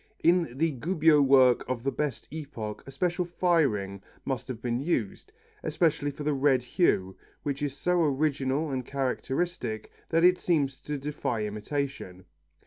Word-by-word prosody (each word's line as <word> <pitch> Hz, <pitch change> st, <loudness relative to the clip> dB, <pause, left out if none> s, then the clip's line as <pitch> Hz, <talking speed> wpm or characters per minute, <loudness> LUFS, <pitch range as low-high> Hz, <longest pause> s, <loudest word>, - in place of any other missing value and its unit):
In 170 Hz, -7 st, +3 dB
the 165 Hz, +2 st, +2 dB
Gubbio 155 Hz, +2 st, +3 dB
work 130 Hz, -3 st, +5 dB
of 125 Hz, -2 st, -2 dB
the 135 Hz, -, 0 dB
best 145 Hz, -5 st, -3 dB
epoch 135 Hz, -9 st, -6 dB
a -, -, -7 dB
special 175 Hz, +6 st, 0 dB
firing 145 Hz, -, +1 dB, 0.2 s
must 130 Hz, -2 st, -3 dB
have 125 Hz, -4 st, -5 dB
been 120 Hz, 0 st, -1 dB
used, 130 Hz, -, -2 dB, 0.3 s
especially 155 Hz, -2 st, +1 dB
for 145 Hz, +1 st, -7 dB
the 150 Hz, 0 st, +1 dB
red 135 Hz, -2 st, +3 dB
hue, 95 Hz, -, +1 dB, 0.3 s
which 140 Hz, -1 st, -3 dB
is 140 Hz, -2 st, -2 dB
so 180 Hz, 0 st, +1 dB
original 145 Hz, 0 st, 0 dB
and 130 Hz, -1 st, -2 dB
characteristic 130 Hz, -2 st, -2 dB, 0.2 s
that 165 Hz, 0 st, +2 dB
it 180 Hz, 0 st, +6 dB
seems 140 Hz, -6 st, 0 dB
to 150 Hz, 0 st, -4 dB
defy 140 Hz, -5 st, -2 dB
imitation. 105 Hz, -3 st, -4 dB
140 Hz, 150 wpm, -28 LUFS, 125-160 Hz, 0.3 s, it